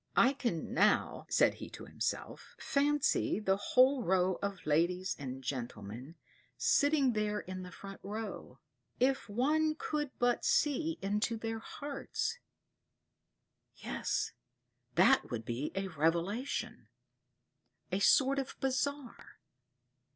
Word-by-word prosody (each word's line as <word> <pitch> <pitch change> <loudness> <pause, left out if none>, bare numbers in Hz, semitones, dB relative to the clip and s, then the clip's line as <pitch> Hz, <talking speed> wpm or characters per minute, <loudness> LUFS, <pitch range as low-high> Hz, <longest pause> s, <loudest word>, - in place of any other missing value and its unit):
"I 260 +3 +6
can 235 - -3
now," - - +2
said - - +4
he - - -9
to - - -10
himself, - - -4
"fancy 290 -5 +1
the 195 -3 +2
whole 255 +5 +4
row 185 -2 +2
of 200 -2 -4
ladies 175 +4 +1
and 135 -1 -6
gentlemen 120 +1 -5 0.4
sitting 285 -3 +3
there 210 -1 -1
in 185 0 -6
the 180 0 -8
front 195 +2 -10
row; 215 +2 -6 0.4
if 265 -2 +1
one 305 +8 +2
could 300 -2 -2
but 245 0 +1
see 315 +2 +2
into 210 +3 0
their 225 0 -3
hearts 285 - -4 1.4
yes, - - -2 0.6
that - - +5
would 115 -3 -4
be 120 +6 -3
a 195 0 -1
revelation 170 - -1 1.0
a 190 - +1
sort 275 +6 +4
of 270 - -5
bazar. 270 0 -2
210 Hz, 115 wpm, -33 LUFS, 180-270 Hz, 1.4 s, I